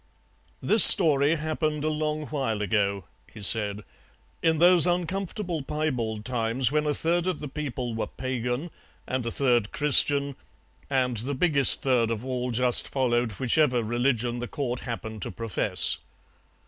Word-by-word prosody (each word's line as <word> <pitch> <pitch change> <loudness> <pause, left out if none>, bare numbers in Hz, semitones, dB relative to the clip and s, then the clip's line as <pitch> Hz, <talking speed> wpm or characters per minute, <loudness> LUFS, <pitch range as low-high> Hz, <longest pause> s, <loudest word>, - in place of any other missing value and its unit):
"This 215 0 +8
story 150 -5 +8
happened 155 -1 -4
a 155 - -1
long 155 0 -4
while 120 -8 -4
ago," 100 -2 -2 0.3
he 105 - -13
said, 105 0 0 0.6
"in 160 -1 0
those 175 +1 +5
uncomfortable 180 0 -4
piebald 125 -8 -5
times 125 0 -2
when 150 0 -1
a 150 - -1
third 170 +2 -2
of 185 -4 -2
the 150 - -7
people 135 -4 -6
were 110 - -5
Pagan, 130 +4 -5 0.3
and 130 -1 -4
a - - -4
third 120 -6 -1
Christian, 140 -1 +3 0.5
and 130 -3 -2
the 130 +6 -5
biggest 140 -2 +1
third 125 -4 0
of 115 +1 -5
all 125 -1 -4
just 125 +1 +2
followed 120 -4 -2
whichever 125 +1 0
religion 120 +1 -2
the 120 - -6
Court 125 -4 -5
happened 110 -3 -8
to - - -5
profess. 115 +1 +1
130 Hz, 150 wpm, -24 LUFS, 115-150 Hz, 0.6 s, This